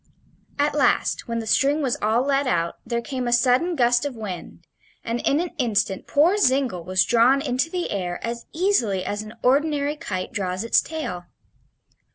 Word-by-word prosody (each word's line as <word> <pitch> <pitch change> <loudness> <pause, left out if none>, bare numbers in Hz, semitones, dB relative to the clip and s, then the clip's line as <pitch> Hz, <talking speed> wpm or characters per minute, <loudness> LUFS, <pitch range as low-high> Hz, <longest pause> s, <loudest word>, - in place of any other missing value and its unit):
At 290 +1 +1
last, 280 -4 +1
when 230 -1 -2
the 225 - -3
string 285 +6 +2
was 255 -3 +1
all 220 +4 +2
let 275 0 +1
out, 170 -3 0
there 235 0 -3
came 255 -2 -4
a - - 0
sudden 250 +8 +3
gust 240 -2 +3
of 285 -3 -4
wind, 200 -6 -8 0.4
and 230 +1 -2
in 285 - +1
an 350 0 -2
instant 205 -6 0
poor 335 +8 +3
Zingle 260 - +1
was 185 +2 +2
drawn 240 +4 +4
into 275 +1 -1
the 355 0 -3
air 180 -3 -3
as 235 0 -5
easily 250 - +1
as 205 0 -3
an 215 0 -10
ordinary 290 +2 +2
kite 185 - -5
draws 185 0 -2
its 230 - +3
tail. 180 - -5
245 Hz, 180 wpm, -23 LUFS, 210-285 Hz, 0.4 s, drawn